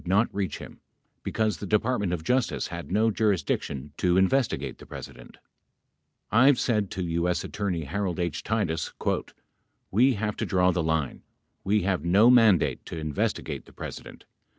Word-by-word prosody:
81 95 +3 +1
not 110 - +2
reach 95 -6 -2
him - - -11 0.4
because 110 -5 -1
the 100 - -6
Department 105 -1 +1
of 85 -3 -3
Justice 125 +7 0
had 85 0 -7
no 110 +3 +3
jurisdiction 75 -9 -1
to 90 0 +2
investigate 110 +7 +1
the - - -12
President: - - -10 0.9
I've 130 +4 +5
said 105 -5 +1
to 95 - -4
[U.S. 85 +1 0
Attorney 95 -6 -3
Harold 90 +4 -3
H.] 85 -4 -2
Titus 95 -7 -1 1.0
"We 125 +6 +4
have 105 0 -2
to - - -1
draw 90 -1 +3
the 90 - 0
line. 80 -3 -1 0.4
We 105 0 +2
have 90 -4 0
no 100 +8 +5
mandate 115 -7 +4
to - - -6
investigate 75 -2 -2
the - - -18
Presi - - -7
dent. - - -13
95 Hz, 160 wpm, -26 LUFS, 85-110 Hz, 1.0 s, I've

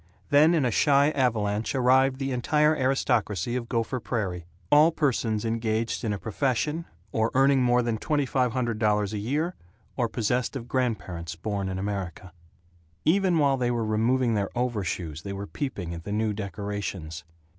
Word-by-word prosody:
Then 155 +4 +6
in 150 -5 +2
a 120 - +1
shy 140 +4 +4
avalanche 110 -5 0
arrived 130 +1 +4
the 135 0 -2
entire 150 +5 +2
aristocracy 120 - 0
of 120 -2 -4
Gopher 115 +2 -1
Prairie: 95 -8 -3 0.3
all 150 +3 +7
persons 115 -8 0
engaged 115 0 -1
in 110 - 0
a 105 - -1
profession, 135 +9 -1 0.3
or 110 0 +1
earning 135 0 +4
more 125 0 +3
than 115 -2 -1
twenty 145 +1 0
five 125 -1 +1
hundred 120 -4 -1
dollars 105 -1 +1
a 105 - -2
year, 150 - -1 0.4
or 120 -3 0
possessed 120 +4 -1
of 120 -3 -5
grandparents 95 -10 -2
born 100 +2 -3
in 95 - -3
America. 95 -2 -4 0.7
Even 185 +1 +3
while 140 -3 +3
they 125 -1 0
were 120 -2 0
removing 115 +3 +1
their 100 -2 0
overshoes 95 -10 -2
they 100 +1 -6
were 100 +1 -5
peeping 100 - -4
at 85 -1 -7
the 100 - -6
new 110 0 0
decorations. 100 -4 -5
115 Hz, 165 wpm, -26 LUFS, 105-130 Hz, 0.7 s, all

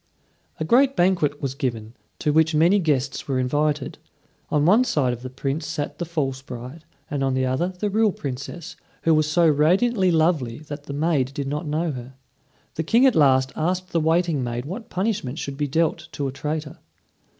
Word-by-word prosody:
A 155 - -1
great 270 - +4
banquet 175 - +1
was 135 -1 -1
given, 120 -6 -4 0.2
to 150 -2 0
which 160 0 +3
many 170 +6 +4
guests 140 -6 -1
were 135 -2 0
invited. 145 +2 -1 0.5
On 150 -1 +2
one 210 +9 +5
side 145 - +1
of 120 - -7
the 130 - -6
Prince 135 +4 -3
sat 150 -3 -4
the 175 - -2
false 140 -6 -2
bride, 130 +4 -9 0.3
and 140 -2 -1
on 135 -1 +1
the 130 0 +1
other 130 +7 0
the 185 +3 -3
real 215 +1 +2
Princess, 150 +5 -6 0.3
who 165 - +4
was 155 -1 +2
so 170 +2 +4
radiantly 185 +8 +3
lovely 155 -8 +1
that 145 -1 -9
the 140 - -6
maid 145 -3 0
did 140 -1 -3
not 150 +3 -3
know 155 +2 -1
her. 130 -1 -8 0.6
The 160 - -2
King 235 - +4
at 265 - +5
last 130 -3 +4
asked 180 +3 -1
the 170 - +2
waiting 165 -2 +1
maid 120 +1 -3
what 200 +9 -7
punishment 185 - -2
should 140 -3 -4
be 145 +1 -1
dealt 160 +2 0
to 145 -3 -2
a - - -3
traitor. 150 +2 -4
150 Hz, 195 wpm, -23 LUFS, 135-170 Hz, 0.6 s, one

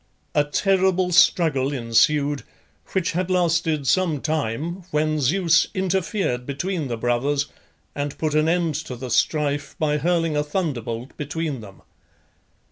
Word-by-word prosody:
A 145 - +4
terrible 185 +3 +1
struggle 150 -6 +4
ensued, 140 +3 +2 0.5
which 190 -3 +1
had 180 +2 -2
lasted 165 -4 +1
some 165 -1 +2
time, 155 +4 -2
when 155 0 0
Zeus 165 +4 +3
interfered 190 - -1
between 155 +2 -2
the 120 -2 -3
brothers, 130 +5 0 0.5
and 145 0 -4
put 155 -2 -1
an 155 +1 +3
end 170 -2 +1 0.2
to 125 - -4
the 125 0 -7
strife 145 -1 0
by 150 -1 +1
hurling 165 0 +1
a 150 - +2
thunderbolt 130 - -3
between 150 -2 -3
them. 100 -3 -13
150 Hz, 130 wpm, -23 LUFS, 140-170 Hz, 0.5 s, A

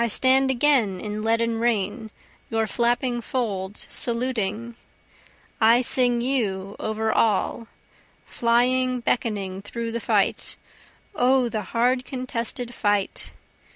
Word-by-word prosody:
I - - +1
stand 265 +4 +3
again 245 -7 +2
in 210 +1 -5
leaden 230 +1 0
rain 220 -1 -1 0.4
your 225 0 0
flapping 240 +2 0
folds 210 -5 -3
saluting, 235 -2 -2 0.9
I 230 +3 +6
sing 245 -1 +3
you 205 -7 -1
over 220 0 -1
all, 220 +1 +1 0.6
flying 250 +2 +1
beckoning 200 -6 -2
through 230 +3 -5
the 235 - -3
fight - - 0 0.6
O 255 0 +2
the 215 -1 -3
hard 245 +5 0
contested 245 -2 -4
fight! 205 -3 -1
235 Hz, 110 wpm, -24 LUFS, 215-250 Hz, 0.9 s, I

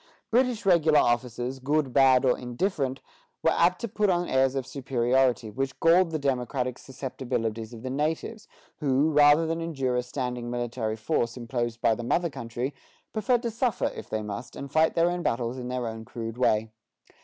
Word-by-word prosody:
British 245 -2 +2
regular 160 -5 +5
officers, 120 0 0
good, 140 0 0
bad, 135 -1 +5
or 125 - +4
indifferent, 130 +1 -2 0.4
were - - +4
apt 180 +1 +3
to 235 - -3
put 210 -1 0
on 175 -1 +1
airs 130 0 +2
of 135 -2 -2
superiority 130 -3 +1
which 135 +4 -3
galled 170 +2 +5
the 160 - -2
democratic 130 -2 -1
susceptibilities 120 -4 -4
of 115 -1 -10
the 130 - -3
natives, 160 - -2 0.3
who, 145 +1 +2
rather 145 +2 +6
than 165 +1 -2
endure 135 -7 -1
a 125 - +2
standing 125 -1 -4
military 120 -2 -2
force 115 0 -1
imposed 120 -1 -3
by 115 - +4
the 120 - -4
mother 170 +7 0
country, 120 +3 -4 0.4
preferred 235 +3 +1
to 235 - -1
suffer 235 0 0
if - - -9
they 110 0 -2
must, 105 +3 -6
and 140 -1 -7
fight 160 +1 +3
their 170 +1 +3
own 175 0 -2
battles 120 -3 -1
in 125 - -5
their 125 -1 -2
own 110 -1 -5
crude 115 0 -6
way. 110 -3 +2
130 Hz, 180 wpm, -27 LUFS, 120-160 Hz, 0.4 s, rather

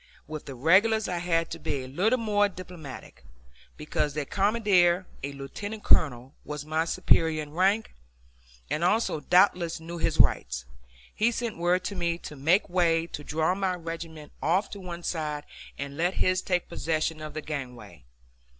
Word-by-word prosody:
With 155 -1 -7
the 135 - -6
regulars 205 - +4
I 180 -2 -2
had 165 -1 0
to 165 - -5
be 140 -3 -3
a - - -8
little 195 - +2
more 205 -3 +2
diplomatic, 175 - -10 0.5
because 150 -1 -2
their 150 -2 -1
commander, 195 -3 +3 0.2
a 140 - -3
lieutenant 205 +11 -7
colonel, 130 -2 +3
was 150 0 -6
my 160 +1 0
superior 165 -3 +2
in 145 - -11
rank, 195 +7 +1 0.7
and 155 - -1
also 195 -2 +2
doubtless 175 0 +3
knew 170 +1 -7
his - - 0
rights. - - +3 0.5
He 230 +2 +2
sent 235 -2 -3
word 180 +1 +2
to 200 - -4
me 170 -2 0
to 150 - -9
make 165 +9 +3
way, 170 -2 +2
to 150 -3 -7
draw 160 +4 +1
my 190 -1 0
regiment 165 -3 -7
off 185 +6 +1
to 200 - -7
one 175 -2 -7
side, 150 -4 -2 0.3
and 140 0 -6
let 175 +3 +1
his 185 0 +2
take 180 -2 0
possession 155 -1 -1
of 155 -1 -7
the 155 - -3
gangway. 130 - -7
170 Hz, 170 wpm, -27 LUFS, 150-185 Hz, 0.7 s, regulars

